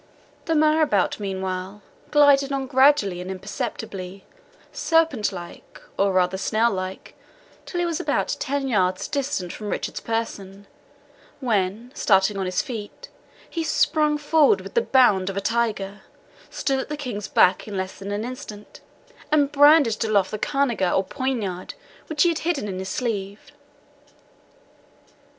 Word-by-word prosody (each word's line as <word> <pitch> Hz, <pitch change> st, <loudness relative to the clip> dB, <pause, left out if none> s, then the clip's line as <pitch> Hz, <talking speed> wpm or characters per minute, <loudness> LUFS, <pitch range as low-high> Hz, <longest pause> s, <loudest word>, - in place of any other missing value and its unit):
The 325 Hz, -, 0 dB
marabout, 305 Hz, -, +2 dB
meanwhile, 190 Hz, 0 st, -4 dB, 0.3 s
glided 285 Hz, -2 st, +5 dB
on 270 Hz, -1 st, -1 dB
gradually 260 Hz, -8 st, +3 dB
and 180 Hz, -, -7 dB
imperceptibly, 190 Hz, 0 st, -6 dB, 0.5 s
serpent 325 Hz, -, +1 dB
like, 175 Hz, -2 st, -10 dB, 0.2 s
or 195 Hz, 0 st, +2 dB
rather 185 Hz, 0 st, +1 dB
snail 225 Hz, +4 st, +2 dB
like, 185 Hz, -1 st, -5 dB, 0.5 s
till 350 Hz, -, -3 dB
he -, -, +1 dB
was 335 Hz, -2 st, -2 dB
about -, -, 0 dB
ten 275 Hz, 0 st, -2 dB
yards 185 Hz, -6 st, +1 dB
distant 275 Hz, -, -2 dB
from 210 Hz, -1 st, -6 dB
Richard's -, -, -3 dB
person, 200 Hz, -4 st, -4 dB, 0.7 s
when, 220 Hz, -1 st, -1 dB
starting 195 Hz, -5 st, +3 dB
on 190 Hz, -1 st, -2 dB
his 185 Hz, -, 0 dB
feet, 245 Hz, -, -8 dB, 0.4 s
he 330 Hz, -, -3 dB
sprung 300 Hz, -1 st, +2 dB
forward 310 Hz, +6 st, +3 dB
with -, -, -10 dB
the 470 Hz, -, +3 dB
bound 215 Hz, -, +3 dB
of 195 Hz, -, -5 dB
a -, -, +2 dB
tiger, 210 Hz, -2 st, -1 dB, 0.5 s
stood 270 Hz, -2 st, -1 dB
at 265 Hz, -, -5 dB
the 300 Hz, -, -4 dB
King's 240 Hz, -8 st, -5 dB
back 185 Hz, +3 st, +3 dB
in 205 Hz, -2 st, -5 dB
less 190 Hz, 0 st, -4 dB
than 195 Hz, +1 st, -6 dB
an 205 Hz, +2 st, -2 dB
instant, 215 Hz, -4 st, -9 dB, 0.5 s
and 290 Hz, -2 st, +3 dB
brandished 290 Hz, -6 st, +5 dB
aloft 205 Hz, -4 st, +1 dB
the 215 Hz, -, -4 dB
cangiar, 260 Hz, -11 st, 0 dB
or 190 Hz, -, +2 dB
poniard, 220 Hz, -8 st, -3 dB, 0.3 s
which 305 Hz, -2 st, +2 dB
he 345 Hz, -, +4 dB
had 330 Hz, -2 st, -1 dB
hidden 315 Hz, -10 st, -1 dB
in 185 Hz, -2 st, -4 dB
his 190 Hz, 0 st, -5 dB
sleeve. 205 Hz, -3 st, -4 dB
220 Hz, 145 wpm, -23 LUFS, 195-285 Hz, 0.7 s, glided